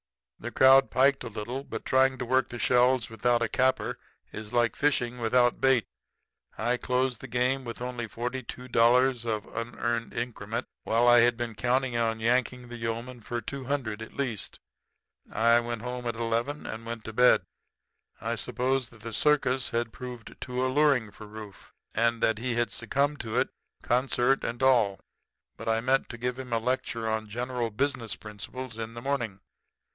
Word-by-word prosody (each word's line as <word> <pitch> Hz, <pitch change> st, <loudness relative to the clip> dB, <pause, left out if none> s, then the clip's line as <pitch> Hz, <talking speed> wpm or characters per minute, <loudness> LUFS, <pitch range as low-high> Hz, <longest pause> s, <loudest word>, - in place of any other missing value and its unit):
"The 120 Hz, -, -5 dB
crowd 135 Hz, +2 st, +6 dB
piked 135 Hz, +1 st, +3 dB
a -, -, -5 dB
little; 120 Hz, +6 st, -5 dB
but -, -, -7 dB
trying 130 Hz, 0 st, +3 dB
to 125 Hz, -, -4 dB
work 130 Hz, +2 st, +2 dB
the 120 Hz, -, -6 dB
shells 125 Hz, 0 st, +3 dB
without 120 Hz, +2 st, +2 dB
a -, -, +1 dB
capper 130 Hz, +4 st, +1 dB, 0.3 s
is 110 Hz, -1 st, -7 dB
like 120 Hz, -1 st, +2 dB
fishing 125 Hz, -4 st, 0 dB
without 120 Hz, +1 st, +3 dB
a -, -, -23 dB
bait. 135 Hz, -3 st, +3 dB, 0.7 s
I 120 Hz, +3 st, +1 dB
closed 125 Hz, 0 st, 0 dB
the -, -, -7 dB
game 125 Hz, +2 st, +1 dB
with 115 Hz, -2 st, -6 dB
only 120 Hz, -1 st, -4 dB
forty 125 Hz, +4 st, -4 dB
two 125 Hz, +1 st, -9 dB
dollars 125 Hz, +1 st, +4 dB
of 110 Hz, -3 st, -1 dB
the -, -, -6 dB
unearned 115 Hz, 0 st, -3 dB
increment, 115 Hz, -2 st, -3 dB, 0.2 s
while 115 Hz, +2 st, +2 dB
I 120 Hz, 0 st, +8 dB
had 120 Hz, 0 st, +4 dB
been 120 Hz, -2 st, -3 dB
counting 125 Hz, +2 st, 0 dB
on 115 Hz, -1 st, 0 dB
yanking 125 Hz, +1 st, 0 dB
the 120 Hz, -, -7 dB
yeomen 115 Hz, +2 st, -4 dB
for 120 Hz, +3 st, -3 dB
two 135 Hz, +4 st, -6 dB
hundred 120 Hz, -6 st, -2 dB
at 110 Hz, -, -9 dB
least. 125 Hz, -8 st, -4 dB, 0.7 s
I 115 Hz, +1 st, +4 dB
went 120 Hz, -1 st, -4 dB
home 125 Hz, 0 st, -4 dB
at 120 Hz, -, -2 dB
eleven 115 Hz, +6 st, -1 dB
and 110 Hz, +1 st, -6 dB
went 115 Hz, -1 st, -6 dB
to 110 Hz, -, -7 dB
bed. 125 Hz, +2 st, +5 dB, 0.8 s
I -, -, -2 dB
supposed 130 Hz, 0 st, -1 dB
that 110 Hz, -3 st, -17 dB
the 115 Hz, -1 st, -6 dB
circus 135 Hz, -2 st, +2 dB
had 115 Hz, -1 st, -2 dB
proved 125 Hz, -3 st, -8 dB
too 125 Hz, +1 st, -1 dB
alluring 130 Hz, -5 st, +3 dB
for 105 Hz, +2 st, -11 dB
Rufe, 105 Hz, -2 st, -11 dB, 0.2 s
and 115 Hz, +1 st, +1 dB
that 110 Hz, -1 st, +2 dB
he 120 Hz, 0 st, -1 dB
had 120 Hz, 0 st, +1 dB
succumbed 140 Hz, +6 st, 0 dB
to 110 Hz, -2 st, -3 dB
it, -, -, +1 dB, 0.3 s
concert 130 Hz, +1 st, +2 dB
and 120 Hz, +3 st, -3 dB
all; 115 Hz, -7 st, +4 dB, 0.6 s
but -, -, -4 dB
I 115 Hz, 0 st, +2 dB
meant 130 Hz, +3 st, +1 dB
to 120 Hz, -, -7 dB
give 125 Hz, +2 st, -3 dB
him 130 Hz, -2 st, -7 dB
a 115 Hz, -, +2 dB
lecture 115 Hz, -1 st, -1 dB
on 110 Hz, -1 st, -2 dB
general 120 Hz, +1 st, -2 dB
business 120 Hz, -1 st, -1 dB
principles 110 Hz, +3 st, -8 dB
in 115 Hz, +1 st, -5 dB
the 120 Hz, -, -6 dB
morning. 120 Hz, -8 st, -2 dB
120 Hz, 185 wpm, -28 LUFS, 115-130 Hz, 0.8 s, I